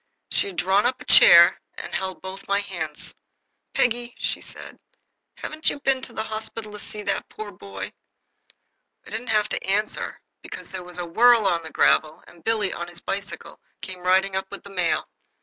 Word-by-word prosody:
She -, -, +3 dB
had 195 Hz, -, -7 dB
drawn 190 Hz, +6 st, +3 dB
up 255 Hz, +1 st, -2 dB
a -, -, -11 dB
chair, 170 Hz, 0 st, +9 dB
and -, -, -8 dB
she -, -, +1 dB
held 190 Hz, -1 st, -6 dB
both 190 Hz, +1 st, -8 dB
my 200 Hz, 0 st, +2 dB
hands. 170 Hz, -7 st, -5 dB, 0.6 s
"Peggy," 240 Hz, 0 st, 0 dB
said -, -, -5 dB
she, -, -, -45 dB, 0.4 s
"haven't 310 Hz, +1 st, 0 dB
you -, -, -5 dB
been 270 Hz, -2 st, +1 dB
to 255 Hz, -, -8 dB
the 220 Hz, -, -3 dB
hospital 220 Hz, 0 st, -6 dB
to 210 Hz, -, -8 dB
see 210 Hz, 0 st, -8 dB
that 200 Hz, -1 st, -2 dB
poor 215 Hz, -1 st, -8 dB
dear 180 Hz, -, -20 dB
boy?" 100 Hz, -1 st, -7 dB, 1.1 s
I -, -, -13 dB
didn't 225 Hz, +3 st, -4 dB
have 215 Hz, -1 st, +2 dB
to -, -, -2 dB
answer, 205 Hz, +3 st, -1 dB, 0.2 s
for -, -, -8 dB
there 190 Hz, -1 st, -6 dB
was 180 Hz, 0 st, -8 dB
a 175 Hz, -, -3 dB
whirl 230 Hz, +5 st, +5 dB
on 170 Hz, -3 st, +2 dB
the 160 Hz, -, -9 dB
gravel, 155 Hz, 0 st, +2 dB
and 170 Hz, -2 st, -18 dB
Billy, 215 Hz, -4 st, +1 dB
on 175 Hz, -, -5 dB
his 175 Hz, 0 st, -6 dB
bicycle, 200 Hz, +1 st, -6 dB, 0.2 s
came 185 Hz, -1 st, -7 dB
riding 190 Hz, +2 st, +2 dB
up 190 Hz, 0 st, -2 dB
with -, -, -9 dB
the 200 Hz, -, -11 dB
mail. 180 Hz, -4 st, 0 dB
195 Hz, 200 wpm, -24 LUFS, 180-220 Hz, 1.1 s, chair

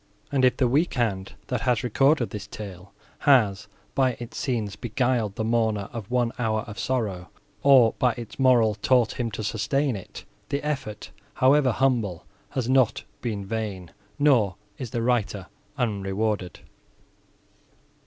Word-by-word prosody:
And, 135 Hz, -2 st, +1 dB
if 125 Hz, 0 st, +4 dB
the 130 Hz, -, +3 dB
weak 145 Hz, +8 st, +1 dB
hand, 100 Hz, -6 st, -1 dB
that 125 Hz, +1 st, -2 dB
has 125 Hz, -4 st, +1 dB
recorded 135 Hz, +2 st, +2 dB
this 105 Hz, -1 st, -6 dB
tale, 100 Hz, -2 st, -9 dB, 0.3 s
has, 110 Hz, -8 st, +3 dB, 0.3 s
by 130 Hz, -2 st, +2 dB
its 120 Hz, 0 st, -8 dB
scenes, 110 Hz, -7 st, -2 dB
beguiled 120 Hz, -2 st, -1 dB
the 110 Hz, -, -2 dB
mourner 110 Hz, -3 st, 0 dB
of 110 Hz, -4 st, -6 dB
one 120 Hz, -1 st, +1 dB
hour 110 Hz, -2 st, 0 dB
of 105 Hz, -1 st, -9 dB
sorrow, 100 Hz, -9 st, -2 dB, 0.3 s
or, 130 Hz, -5 st, +6 dB
by 125 Hz, -3 st, +3 dB
its 120 Hz, +1 st, -9 dB
moral, 120 Hz, -5 st, +5 dB
taught 120 Hz, +3 st, +2 dB
him 120 Hz, -2 st, 0 dB
to 110 Hz, 0 st, -5 dB
sustain 130 Hz, +5 st, 0 dB
it—the 140 Hz, +8 st, -7 dB
effort, 130 Hz, -8 st, -4 dB, 0.2 s
however 135 Hz, 0 st, +4 dB
humble, 115 Hz, -9 st, 0 dB, 0.2 s
has 130 Hz, -3 st, -2 dB
not 130 Hz, -3 st, +3 dB, 0.2 s
been 105 Hz, -5 st, -3 dB
vain, 100 Hz, -4 st, -4 dB, 0.3 s
nor 120 Hz, -11 st, +3 dB, 0.2 s
is 125 Hz, -, -5 dB
the 115 Hz, +1 st, -2 dB
writer 110 Hz, -5 st, 0 dB, 0.3 s
unrewarded. 100 Hz, -3 st, -2 dB
115 Hz, 145 wpm, -25 LUFS, 105-130 Hz, 0.3 s, or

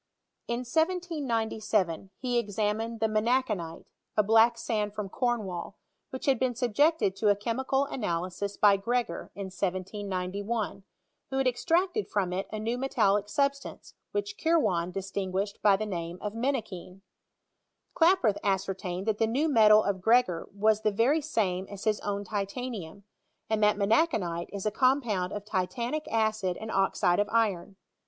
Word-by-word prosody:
In 235 Hz, +1 st, -1 dB
1797 235 Hz, -, -1 dB
he 245 Hz, -2 st, 0 dB
examined 215 Hz, +2 st, -2 dB
the -, -, +3 dB
menachanite, 215 Hz, -6 st, -1 dB, 0.3 s
a 210 Hz, -, +5 dB
black 225 Hz, +3 st, +5 dB
sand 210 Hz, -3 st, -2 dB
from 210 Hz, -2 st, -4 dB
Cornwall, 205 Hz, -7 st, -2 dB, 0.3 s
which 260 Hz, -, -6 dB
had 270 Hz, -4 st, +3 dB
been 255 Hz, -2 st, 0 dB
subjected 250 Hz, -, +2 dB
to 215 Hz, -, +2 dB
a 205 Hz, -, +5 dB
chemical 260 Hz, +6 st, 0 dB
analysis 185 Hz, -4 st, -3 dB
by 205 Hz, -1 st, +5 dB
Gre°;or, 235 Hz, -4 st, -2 dB
in 195 Hz, -1 st, -6 dB
1791, 195 Hz, +2 st, -3 dB, 0.5 s
tvho 265 Hz, -, -1 dB
had 270 Hz, -, +1 dB
estracted 350 Hz, -, +1 dB
from 190 Hz, -3 st, -1 dB
it 190 Hz, +2 st, -2 dB
a 215 Hz, -, -3 dB
new 230 Hz, +3 st, -2 dB
metallic 210 Hz, -6 st, +1 dB
substance, 280 Hz, +4 st, -2 dB, 0.2 s
which 205 Hz, 0 st, -3 dB
Kirwan 240 Hz, -, +2 dB
distinguished 195 Hz, +1 st, -3 dB
by 205 Hz, -2 st, +5 dB
the 215 Hz, -, -3 dB
name 170 Hz, -3 st, -4 dB
of 210 Hz, -1 st, -4 dB
mettackiiM. 220 Hz, -7 st, -3 dB, 0.9 s
Klaproth 325 Hz, -, +4 dB
ascertained 190 Hz, -1 st, -2 dB
that 220 Hz, -2 st, 0 dB
the 225 Hz, -, +3 dB
new 270 Hz, +8 st, +1 dB
tnetal 215 Hz, -5 st, +6 dB
of 195 Hz, -2 st, -1 dB
Gregor 225 Hz, -5 st, +2 dB
iras 215 Hz, 0 st, +3 dB
the 215 Hz, -, +2 dB
very 235 Hz, +10 st, +2 dB
same 195 Hz, -10 st, -1 dB
as 200 Hz, -1 st, -8 dB
hia 215 Hz, -, +3 dB
own 200 Hz, 0 st, -2 dB
titanium, 200 Hz, -2 st, -5 dB, 0.5 s
and 220 Hz, -1 st, +1 dB
that 210 Hz, -1 st, +4 dB
menacbanite 200 Hz, -, +1 dB
is 200 Hz, 0 st, -5 dB
a 215 Hz, -, +1 dB
compound 235 Hz, -7 st, +1 dB
of 205 Hz, -1 st, -5 dB
titanic 235 Hz, +9 st, -2 dB
acid 215 Hz, -5 st, 0 dB
and 220 Hz, +1 st, -6 dB
oxide 190 Hz, -2 st, +2 dB
of 205 Hz, 0 st, +1 dB
iron. 200 Hz, -5 st, 0 dB
215 Hz, 145 wpm, -28 LUFS, 195-240 Hz, 0.9 s, tnetal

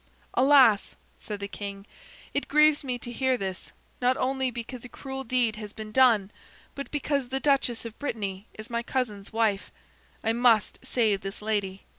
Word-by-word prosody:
"Alas!" 260 Hz, -6 st, +5 dB, 0.2 s
said 210 Hz, -2 st, -5 dB
the 200 Hz, -, -4 dB
king. 200 Hz, -1 st, -7 dB, 0.5 s
"It 285 Hz, -, -1 dB
grieves 300 Hz, 0 st, +5 dB
me 250 Hz, -2 st, -2 dB
to 240 Hz, -, -7 dB
hear 260 Hz, +1 st, +1 dB
this, 190 Hz, -3 st, -5 dB, 0.3 s
not 250 Hz, +1 st, +3 dB
only 265 Hz, 0 st, 0 dB
because 240 Hz, 0 st, -7 dB
a 250 Hz, -, -9 dB
cruel 270 Hz, +1 st, -6 dB
deed 240 Hz, -3 st, +1 dB
has 210 Hz, -1 st, -8 dB
been 215 Hz, -1 st, -8 dB
done, 220 Hz, -5 st, +4 dB, 0.4 s
but 280 Hz, -, -6 dB
because 285 Hz, -2 st, -1 dB
the 265 Hz, +2 st, -2 dB
duchess 270 Hz, -5 st, +1 dB
of 225 Hz, -1 st, -8 dB
Brittany 205 Hz, -7 st, -4 dB
is 215 Hz, +2 st, -10 dB
my 235 Hz, 0 st, 0 dB
cousin's 230 Hz, -6 st, -3 dB
wife. 220 Hz, -3 st, +1 dB, 0.5 s
I 225 Hz, -, +2 dB
must 235 Hz, -2 st, +3 dB
save 220 Hz, -6 st, +1 dB
this 195 Hz, +1 st, -6 dB
lady. 205 Hz, -3 st, -2 dB
235 Hz, 170 wpm, -27 LUFS, 210-260 Hz, 0.5 s, Alas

